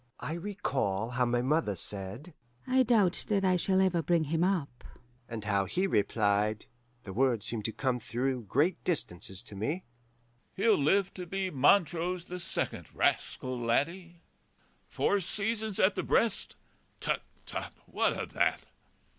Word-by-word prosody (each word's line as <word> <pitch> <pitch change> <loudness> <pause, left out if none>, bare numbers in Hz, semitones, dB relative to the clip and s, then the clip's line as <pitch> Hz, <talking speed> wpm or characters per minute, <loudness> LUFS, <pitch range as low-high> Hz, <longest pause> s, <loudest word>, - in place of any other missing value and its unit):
I 155 - -4
recall 135 - -2
how 125 0 +1
my 120 0 +1
mother 140 -6 +1
said, 100 - -1 0.3
'I 260 0 +3
doubt 210 -7 +3
that 200 -2 +2
I 185 -1 +4
shall 190 +2 +2
ever 185 -3 +3
bring 165 +1 +2
him 160 +3 0
up,' 165 -10 -1 0.5
and 115 -3 -5
how 100 -2 +1
he 180 - 0
replied 105 - +1 0.4
(the 95 - -7
words 120 -2 +1
seem 115 -2 -2
to 110 - -2
come 130 0 -1
through 125 +1 -2
great 150 - +1
distances 95 - -1
to 105 - -10
me), 145 - -2 0.7
'He'll 215 +2 +4
live 190 +7 +2
to 180 -1 -7
be 190 +1 -2
Montrose 170 +4 +2
the 180 0 -6
second, 170 - -3
rascal 130 -1 0
laddie! 170 +9 -1 0.6
Four 200 - +1
seasons 215 +2 -2
at 190 +1 +4
the - - -2
breast? 230 -3 0 0.4
Tut, - - -1 0.2
tut! - - -5
what - - +1
o' - - -2
that? - - 0
155 Hz, 150 wpm, -30 LUFS, 115-185 Hz, 0.7 s, I